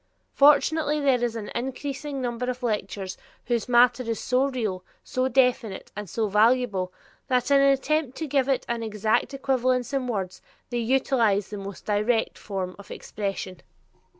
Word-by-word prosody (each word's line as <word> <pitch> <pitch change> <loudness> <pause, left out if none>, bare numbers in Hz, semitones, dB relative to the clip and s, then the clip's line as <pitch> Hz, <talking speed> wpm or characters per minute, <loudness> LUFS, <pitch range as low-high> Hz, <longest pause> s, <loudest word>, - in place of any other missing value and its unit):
Fortunately 300 +1 +4
there 265 -4 +2
is 235 -1 -1
an 215 -2 -6
increasing 275 +2 -4
number 245 0 -2
of 250 0 -5
lecturers 195 -4 -3 0.3
whose 240 -1 -1
matter 245 +1 +5
is 230 -2 -3
so 255 +1 +1
real, 215 -9 -3 0.2
so 255 0 -1
definite, 250 -5 +1
and 210 -2 -6
so 220 +4 -1
valuable, 210 -3 +2 0.4
that 255 0 +1
in 280 0 +6
an 275 - +5
attempt 275 0 0
to 320 - -3
give 275 -2 +1
it 265 - +1
an 235 -1 -2
exact 215 +1 0
equivalence 255 -1 0
in 265 -2 -1
words, 190 -6 -3 0.3
they 240 - -1
utilize 230 -4 +2
the 210 - -6
most 195 -1 -8
direct 215 +2 0
forms 190 -3 -4
of 200 - -13
expression. 195 -3 -5
240 Hz, 160 wpm, -25 LUFS, 210-265 Hz, 0.4 s, in